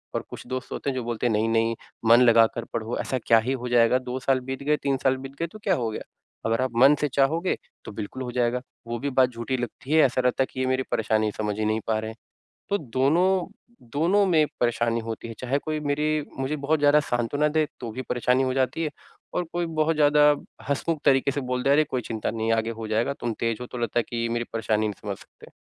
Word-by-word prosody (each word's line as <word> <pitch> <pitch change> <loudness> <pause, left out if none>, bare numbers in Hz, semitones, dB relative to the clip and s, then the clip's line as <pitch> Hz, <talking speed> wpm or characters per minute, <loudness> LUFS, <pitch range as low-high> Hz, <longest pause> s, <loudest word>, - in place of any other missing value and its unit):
और - - 0
कुछ - - -9
दोस्त 130 0 -5
होते - - -3
हैं 135 - -2
जो 130 - -2
बोलते 120 0 -3
हैं 120 - +1
नहीं-नहीं 115 +1 +1 0.3
मन 120 +2 +8
लगाकर 115 -1 +4
पढ़ो, 115 +1 -2
ऐसा 130 - -2
क्या 115 - +6
ही 125 +4 -1
हो 125 - -3
जाएगा? 120 +1 +4
2 125 0 -5
साल 135 0 +2
बीत 135 +1 -5
गए 150 +1 +2
3 135 -1 +1
साल 130 -1 +3
बीत 135 +1 -9
गए 170 - -1
तो 215 - -13
क्या 190 -3 +2
हो 120 -7 -1
गया? - - -5 0.4
अगर 115 +2 +1
आप 130 - 0
मन 140 +2 +7
से 150 - +2
चाहोगे 155 +7 +1 0.3
तो - - -7
बिल्कुल 105 +6 -6
हो 125 - -5
जाएगा। 125 0 0 0.3
वो 120 0 -3
भी 140 - -2
बात 130 -1 +3
झूठी 120 +2 -3
लगती 120 +3 -6
है, 160 - +6
ऐसा 130 0 +1
लगता 125 +1 +3
है - - -4
कि - - -6
ये 130 - +1
मेरी 130 0 +1
परेशानी 110 -1 +1
समझ 105 -1 -2
ही 110 - 0
नहीं 110 +1 +1
पा 110 -1 +1
रहे 110 0 -5
हैं, 110 - -14 0.5
तो 200 - +1
दोनों, 165 - +2 0.4
दोनों 175 - +2
में 160 -4 +4
परेशानी 120 -1 +1
होती 115 0 -6
है। 115 - -7
चाहे 130 +2 0
कोई 155 +1 -3
मेरी 150 +1 0
मुझे 135 +3 -1
बहुत 150 +2 0
ज़्यादा 145 +1 +5
सांत्वना 145 +3 0
दे 155 0 +1
तो 120 - -5
भी 130 - -5
परेशानी 125 +1 +1
हो 130 0 0
जाती 135 +5 0
है 155 - -2 0.4
और 180 - 0
कोई 175 0 -1
बहुत 160 0 +1
ज़्यादा 150 0 +4 0.5
हँसमुँख 150 +3 -1
तरीके 135 +1 +4
से 145 - -2
बोल 125 -1 -2
दे, 135 - +2
"अरे! 150 +2 +5
कोई 130 -4 -2
चिंता 110 -1 -3
नहीं, 115 0 -2
आगे 115 0 +1
हो 115 -1 -6
जाएगा 110 +5 +1
तुम 120 - -1
तेज़ 115 -2 0
हो" 125 - -5
तो 125 - -8
लगता 120 0 -1
है - - 0
कि 120 - -5
ये 115 0 0
मेरी 120 0 -1
परेशानी 110 -1 0
नहीं 105 - -7
समझ 100 -2 -4
सकते। - - -17
130 Hz, 250 wpm, -25 LUFS, 115-145 Hz, 0.5 s, मन